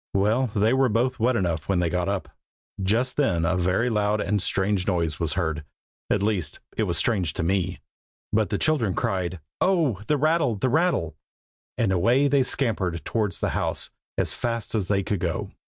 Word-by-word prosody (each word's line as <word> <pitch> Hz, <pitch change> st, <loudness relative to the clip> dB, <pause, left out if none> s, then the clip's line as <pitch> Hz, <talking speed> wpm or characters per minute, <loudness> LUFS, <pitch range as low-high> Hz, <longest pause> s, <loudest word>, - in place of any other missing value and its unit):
Well, 110 Hz, +7 st, +2 dB
they 110 Hz, +3 st, +3 dB
were 130 Hz, -1 st, +3 dB
both 125 Hz, +4 st, 0 dB
wet 120 Hz, +3 st, +2 dB
enough 85 Hz, -6 st, -1 dB
when 95 Hz, -, +2 dB
they 90 Hz, -1 st, +2 dB
got 90 Hz, +1 st, 0 dB
up. 100 Hz, -1 st, -2 dB, 0.5 s
Just 115 Hz, +7 st, +1 dB
then 90 Hz, -, +2 dB
a 90 Hz, +3 st, +2 dB
very 90 Hz, +6 st, +1 dB
loud 105 Hz, -2 st, +1 dB
and 105 Hz, -1 st, 0 dB
strange 95 Hz, 0 st, 0 dB
noise 85 Hz, -5 st, 0 dB
was 85 Hz, -3 st, 0 dB
heard. 80 Hz, -4 st, -1 dB, 0.5 s
At 100 Hz, -, +1 dB
least, 95 Hz, -8 st, -1 dB, 0.2 s
it 110 Hz, -, +1 dB
was 85 Hz, -3 st, -1 dB
strange 95 Hz, -1 st, +1 dB
to -, -, -2 dB
me, 90 Hz, 0 st, 0 dB, 0.5 s
but 110 Hz, -1 st, +2 dB
the 100 Hz, -, 0 dB
children 125 Hz, -, +1 dB
cried 95 Hz, -6 st, -1 dB, 0.2 s
"Oh! 160 Hz, -, +2 dB
the 150 Hz, -, +2 dB
rattle, 155 Hz, -4 st, +2 dB
the 130 Hz, +6 st, 0 dB
rattle!" 145 Hz, -, +1 dB, 0.6 s
and 110 Hz, -4 st, +1 dB
away 120 Hz, +10 st, +3 dB
they 140 Hz, -1 st, +3 dB
scampered 105 Hz, -, -1 dB
towards 105 Hz, -5 st, -1 dB
the -, -, +1 dB
house, -, -, -1 dB, 0.3 s
as -, -, +1 dB
fast 115 Hz, -2 st, -3 dB
as 105 Hz, -5 st, 0 dB
they 100 Hz, 0 st, +1 dB
could 100 Hz, 0 st, -1 dB
go. 85 Hz, -2 st, -2 dB
105 Hz, 190 wpm, -25 LUFS, 90-120 Hz, 0.6 s, they